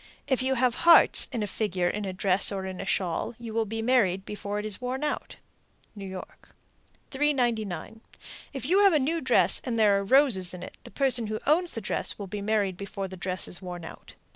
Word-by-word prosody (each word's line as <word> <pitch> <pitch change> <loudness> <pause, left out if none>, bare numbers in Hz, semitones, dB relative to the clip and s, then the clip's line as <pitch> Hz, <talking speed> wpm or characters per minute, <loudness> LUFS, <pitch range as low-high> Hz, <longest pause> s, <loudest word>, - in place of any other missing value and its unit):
If 265 -2 0
you 265 +1 0
have 250 -1 +1
hearts 340 0 +6
in 235 -5 -3
a - - -1
figure 190 -4 -2
in 205 +3 -3
a 190 - -3
dress 190 +1 +5
or 195 -1 -4
in 185 -1 -6
a 195 - -7
shawl, 185 +6 -2
you 230 -2 -8
will 225 0 0
be 225 +1 -5
married 200 -7 +1
before 205 0 -5
it 210 - -4
is 215 +2 -1
worn 255 +3 -4
out. 300 - -4 0.6
New 200 -2 -8
York. 185 -1 -11 0.6
399. 240 -7 -2 0.5
If 270 -3 -6
you 365 +7 +3
have 400 -3 +5
a - - +4
new 315 +4 -1
dress - - +3
and 240 -3 -3
there 205 -3 +3
are - - -3
roses 200 -7 +3
in 180 - -9
it, - - -10
the - - -9
person 255 -5 +2
who 215 0 -3
owns 335 +5 +1
the 225 - -5
dress 215 - 0
will 200 - -6
be 200 +2 -6
married 200 -3 -1
before 200 0 -6
the 190 - -9
dress 185 0 -4
is 180 - -6
worn 175 -2 -8
out. - - -12
215 Hz, 220 wpm, -26 LUFS, 190-255 Hz, 0.6 s, hearts